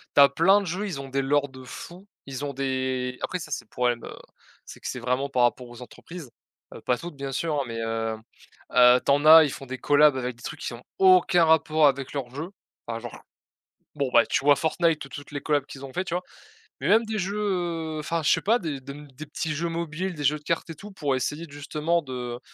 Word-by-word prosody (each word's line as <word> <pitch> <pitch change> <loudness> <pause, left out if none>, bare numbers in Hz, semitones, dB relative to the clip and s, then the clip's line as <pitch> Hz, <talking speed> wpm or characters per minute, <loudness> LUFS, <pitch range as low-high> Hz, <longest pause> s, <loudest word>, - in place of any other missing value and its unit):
Tu - - +8
as 140 - +9
plein 190 +8 +4
de - - -6
jeux, 190 +4 -3
ils 165 -8 -5
ont 135 - -8
des 135 +1 0
lores 145 +1 +1
de 130 -1 -12
fou, 175 +9 -10 0.2
ils 135 0 -6
ont 140 - -4
des 130 -1 -2
après 180 - -2
ça 155 - -9
c'est - - -3
le - - -39
problème, 120 -1 -1
heu, - - -8 0.5
c'est - - -11
que - - -7
c'est 125 - -4
vraiment 125 +3 -1
par 125 -2 +2
rapport 120 +1 +1
aux 120 0 -12
entreprises, 160 +2 -11 0.4
heu, - - -10
pas 125 - 0
toutes 170 +1 -8
bien 140 0 -5
sûr, 155 +3 -1
hein, - - -2
mais, 115 -1 -5
heu 115 0 -2 0.6
heu, 125 0 +7
tu - - +3
en 145 +2 +2
as 160 +1 +10
ils 145 - -3
font 135 - -8
des 130 +1 -5
collabs 145 0 +4
avec 125 -1 -3
des - - -18
trucs - - -7
qui - - -4
ont 120 +1 -10 0.2
aucun 185 -2 +5
rapport 160 -1 +4
avec 135 -1 -1
leur 135 -4 -4
jeu 155 +6 -5 0.4
enfin 115 -1 -4
genre 120 0 -9 0.8
bon, 140 -3 -1
bah, 120 - +6
tu - - 0
vois 145 0 +6
Fortnite? 160 +2 +1
Toutes 145 +1 -10
les 145 - -4
collabs 145 -2 0
qu'ils 135 - -10
ont 135 - -12
fait. 185 - -1
Tu 175 - -7
vois? 180 - -1 0.6
Mais 140 - -1
même 220 +5 +5
des 220 0 -3
jeux, 200 +2 -2 0.6
heu, - - -3
enfin 165 +2 -2
je 150 - +2
sais - - +3
pas 230 +4 +3
des 155 -6 -4
de 140 +1 -8
mmh, 145 +1 -11
des 150 +4 -9
petits 150 +1 -3
jeux 170 +3 -2
mobiles, 170 +2 -3
des 150 - -6
jeux 150 +2 +3
de - - -26
cartes 165 +2 -2
et 165 - -6
tout, 205 +7 -11
pour 145 -8 -1
essayer 150 +6 -3
justement 150 +4 -1
de 125 -3 -5
145 Hz, 255 wpm, -25 LUFS, 130-165 Hz, 0.8 s, as